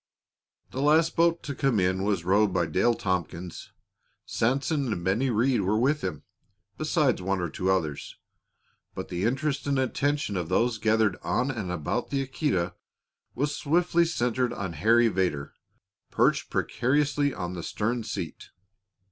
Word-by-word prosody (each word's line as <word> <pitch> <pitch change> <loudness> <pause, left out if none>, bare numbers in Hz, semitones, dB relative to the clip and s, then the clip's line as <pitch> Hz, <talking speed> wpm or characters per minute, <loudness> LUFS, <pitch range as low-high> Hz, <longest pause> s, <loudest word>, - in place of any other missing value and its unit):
The 130 - -3
last 155 +3 +3
boat 170 0 +2
to 140 - -4
come 130 -5 +1
in 95 +1 +1
was 100 -4 0
rowed 100 +2 +3
by 90 -2 +1
Dale 115 +8 +2
Tompkins. 90 -3 -4 0.5
Sanson 135 +2 0
and 85 -5 -3
Bennie 115 +8 +1
Rhead 120 +1 +2
were 100 +3 +1
with 140 +6 +1
him, 75 - -4 0.5
besides - - +1
one 95 +1 -1
or 85 -2 -3
two 95 - -2
others; 80 -7 -1 0.8
but - - -6
the 90 +3 -2
interest 135 +5 -1
and 140 -1 +1
attention 135 -4 0
of 85 -2 -3
those 115 -2 +1
gathered 110 -2 +2
on 125 +2 0
and 110 -8 -4
about 90 +8 -2
the 135 -1 -1
Aquita 110 - -1 0.6
was 145 +3 -1
swiftly 170 +3 +2
centered 125 -6 0
on 95 -7 -4
Harry 115 +9 +4
Vedder, 90 -9 -1 0.6
perched - - +2
precariously 145 +2 +1
on 90 -6 -5
the 90 - -5
stern 115 +8 -2
seat. - - -6
115 Hz, 150 wpm, -27 LUFS, 95-135 Hz, 0.8 s, Harry